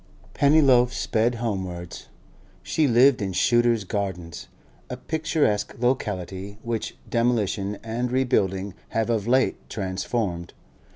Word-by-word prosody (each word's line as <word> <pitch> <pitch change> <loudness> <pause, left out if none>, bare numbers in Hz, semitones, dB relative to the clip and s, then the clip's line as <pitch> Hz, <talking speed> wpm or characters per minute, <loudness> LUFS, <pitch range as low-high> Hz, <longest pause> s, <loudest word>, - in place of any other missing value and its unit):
Pennyloaf 140 -4 +4
sped 115 0 0
homewards. 95 -7 -5 0.6
She 155 -2 +1
lived 125 +1 +5
in 95 -2 -2
Shooter's 120 +1 +3
Gardens, 90 -4 -4 0.4
a - - -5
picturesque 155 -10 -1
locality 100 -5 -2
which 115 -1 -3
demolition 105 -4 0
and 120 +2 -2
rebuilding 100 -7 0 0.2
have 115 +1 0
of 110 -2 -1
late 130 +2 +1
transformed. 95 -2 -3
115 Hz, 105 wpm, -24 LUFS, 95-125 Hz, 0.6 s, lived